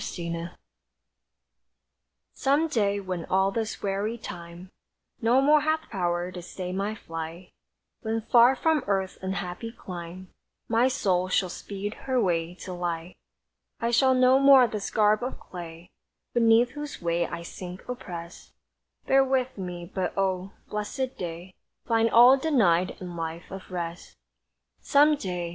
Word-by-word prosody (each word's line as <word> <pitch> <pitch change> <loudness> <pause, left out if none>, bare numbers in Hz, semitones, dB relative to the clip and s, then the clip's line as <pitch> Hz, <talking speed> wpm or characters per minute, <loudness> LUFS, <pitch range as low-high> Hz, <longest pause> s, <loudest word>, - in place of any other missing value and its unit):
SOME 170 -1 -4
DAY 170 +1 -4 1.8
Some 285 +4 +2
day 205 -8 +1
when 185 -3 -4
all 190 +1 +2
this 220 +1 -3
weary 200 +3 -1
time 175 -3 -9 0.5
No 240 +3 +4
more 295 +2 +5
hath 315 +1 -1
power 175 -3 -1
to 180 -1 -7
stay 180 +1 -6
my 200 +3 -2
flight; 165 -1 -7 0.5
When 225 0 -2
far 240 +3 +5
from 315 +2 +1
earth's 195 -2 -1
unhappy 190 +3 -4
clime 180 -3 -9 0.4
My 230 +2 +3
soul 185 -9 +1
shall 185 0 +1
speed 200 +3 -5 0.2
her 260 -1 +3
way 175 -4 0
to 185 - -5
light, 175 -1 -4 0.6
I 235 +1 0
shall 260 +2 +4
no 255 +1 +5
more 275 -2 +8
this 210 -3 -4
garb 215 -1 +3
of 250 +2 -4
clay 170 -1 -10 0.4
(Beneath 230 0 +4
whose 295 0 -7
weight 170 0 0
I 170 0 -5
sink 180 +1 -9
opprest) 175 -8 -8 0.5
Bear 270 0 +5
with 260 -1 0
me; 180 -3 -6
but, 185 -1 -2
oh 190 0 0 0.2
blesséd 230 +5 -3
day, 175 +1 -7 0.3
Find 230 0 +2
all 245 +4 +8
denied 205 - +2
in 180 -2 -7
life 165 +1 -5
of 190 0 -8
rest! 175 -1 -6 0.6
Some 295 +1 +4
day! 180 -9 -4
195 Hz, 145 wpm, -27 LUFS, 175-240 Hz, 1.8 s, more